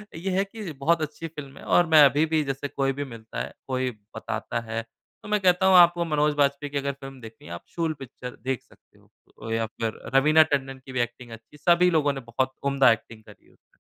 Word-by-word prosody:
ये 180 +4 -3
है 195 - +3
कि 200 -3 -8
बहुत 155 +4 +1
अच्छी 155 +2 -5
फ़िल्म 150 -4 -10
है, - - -12
और 175 - +4
मैं 155 -1 +9
अभी 145 +3 +3
भी, 160 -1 +1
जैसे 135 0 -3
कोई 135 -1 -1
भी 145 +2 -4
मिलता 110 -1 -7
है, - - -6
कोई 130 -1 -1 0.3
बताता - - -3
है, 115 +1 -2 0.4
तो - - -10
मैं 210 0 +2
कहता 180 0 +3
हूँ, 190 0 +6
"आपको 175 0 +6
मनोज 150 -1 +1
बाजपेयी 140 0 +1
की 145 - -2
अगर 140 0 -1
फ़िल्म 135 -1 -9
देखनी 110 -4 -12
है, 85 - -7
आप 85 - -8
शूल 165 -2 0
पिक्चर 125 -1 -9
देख 130 -2 -2
सकते - - -25
हो।" - - -26 0.3
ओ 115 - -6
या 115 0 0
फिर 110 0 -5
रवीना 155 +4 +6
टंडन 135 -1 -2
की 135 - -9
भी 130 - -2
एक्टिंग 120 0 -5
अच्छी, 115 +6 -13
सभी 175 +3 +4
लोगों 150 -3 +2
ने 135 - -5
बहुत 130 +2 0 0.2
उम्दा 135 -3 +5
एक्टिंग 115 0 -4
करी 105 -1 -17
है - - -24
उसमें। - - -35
140 Hz, 235 wpm, -25 LUFS, 125-160 Hz, 0.4 s, मैं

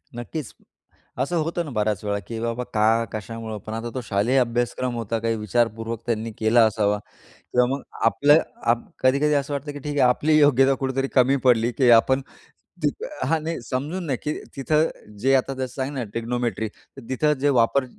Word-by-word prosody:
नक्कीच 120 +3 -6 0.7
असं 140 +6 -1
होतं 170 +2 -2
ना, 145 - -7
बऱ्याच 105 -3 -1
वेळा 100 -1 -1
की 115 -1 -5
बाबा 115 +2 -2
का? 110 +2 +3
कशामुळं? 110 +1 -6
पण 110 - -5
आता 115 +1 -4
तो 130 - -3
शालेय 115 +3 +1
अभ्यासक्रम 120 +1 -1
होता 115 -1 -2
काही 115 0 0
विचारपूर्वक 115 +1 -1
त्यांनी 115 -1 -2
केला 115 +2 +5
असावा 105 -1 +1 0.3
किंवा 125 0 0
मग 140 - -10 0.2
आपलं 145 +6 +5 0.3
आप 120 0 +2 0.2
कधी-कधी 140 +3 +3
असं 140 0 -1
वाटतं 145 +1 -4
की 145 - -7
ठीक 145 +1 -5
आहे. 125 - +5
आपली 150 +5 +3
योग्यता 135 -2 +5
कुठेतरी 135 0 -1
कमी 130 +2 +4
पडली 120 -2 +4
की 130 -3 +5
आपण 130 +3 0 0.6
ती - - +4 0.4
हां 165 -1 +1
नाही 165 -4 -3
समजून 150 +8 -3
नाही 135 -5 -1
की 150 - -1 0.2
तिथं 155 +3 +2 0.3
जे 135 +5 +2
आता 135 +1 +1
जसं 130 -1 -4
सांग 135 +1 -3
ना 130 -3 -3
ट्रिग्नोमेट्री 115 +1 -2
तर 135 - -16
तिथं 150 +4 +2
जे 145 +2 +2
वापर 130 +4 +2
125 Hz, 185 wpm, -23 LUFS, 115-140 Hz, 0.7 s, केला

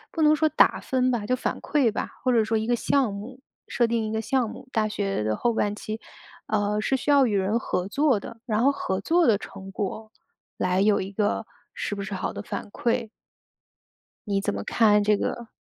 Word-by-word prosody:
不 325 - -1
能 305 0 +6
说 315 0 +3
打 - - +4
分 255 -1 +1
吧， 225 -4 -1
就 255 - +2
反 255 - -2
馈 280 -6 +2
吧， - - -3
或 255 - +2
者 230 -2 +4
说 225 +1 0
一 220 0 -1
个 240 - +3
项 255 -2 +1
目 235 +6 -8 0.3
设 240 - +1
定 230 -1 0
一 215 - -3
个 220 - 0
项 250 0 0
目， 255 - -10
大 220 -1 +2
学 200 - -2
的 110 0 0
后 240 - +1
半 210 -2 0
期， 215 +1 -6 0.5
呃， 210 0 0
是 265 +5 +1
需 290 - -2
要 280 -2 +6
与 210 -4 0
人 195 +4 +1
合 185 -4 -2
作 275 -2 +2
的， 230 - -9
然 220 0 +1
后 275 - +5
合 190 -8 -2
作 335 - +3
的 225 -4 +5
成 195 -1 -10
果 215 +2 -4 0.4
来 185 +1 +1
有 205 +1 +3
一 190 - -4
个 205 +1 0 0.3
是 205 - -3
不 200 - -4
是 200 +1 -5
好 185 - -3
的 - - -6
反 205 - -6
馈？ 235 0 -1 1.2
你 200 -1 +1
怎 195 - -1
么 100 - -4
看 210 - +4
这 210 0 +3
个？ 235 +2 -3
220 Hz, 240 characters per minute, -25 LUFS, 205-250 Hz, 1.2 s, 能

